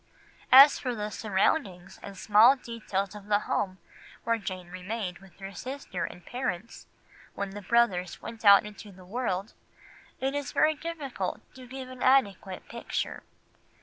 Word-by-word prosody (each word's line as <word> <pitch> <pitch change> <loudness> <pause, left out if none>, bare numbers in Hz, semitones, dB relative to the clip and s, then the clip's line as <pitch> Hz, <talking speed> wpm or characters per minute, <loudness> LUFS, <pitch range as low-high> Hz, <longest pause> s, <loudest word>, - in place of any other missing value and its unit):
As 275 +3 +9
for 250 -2 -3
the 210 -1 -4
surroundings 195 - -1
and 200 -1 -9
small 220 +7 +6
details 215 -6 -4
of 205 -1 -11
the 205 0 +2
home 185 -3 -2 0.5
where 230 0 0
Jane 185 -3 -6
remained 185 0 -5
with 195 -2 -18
her 195 0 -8
sister 255 -4 -5
and 175 - -10
parents 235 -5 -5 0.5
when 200 -1 -4
the 205 +1 -8
brothers 190 -4 +1
went 230 -1 -9
out 200 0 +8
into 210 0 -10
the 185 -1 -15
world, 200 -1 -3 0.7
it 270 +1 -1
is 285 -3 -4
very 310 +1 +4
difficult 290 - -5
to 255 -1 -12
give 260 +1 -7
an 255 0 -11
adequate 205 -8 +2
picture. 235 - -4
210 Hz, 150 wpm, -28 LUFS, 190-255 Hz, 0.7 s, As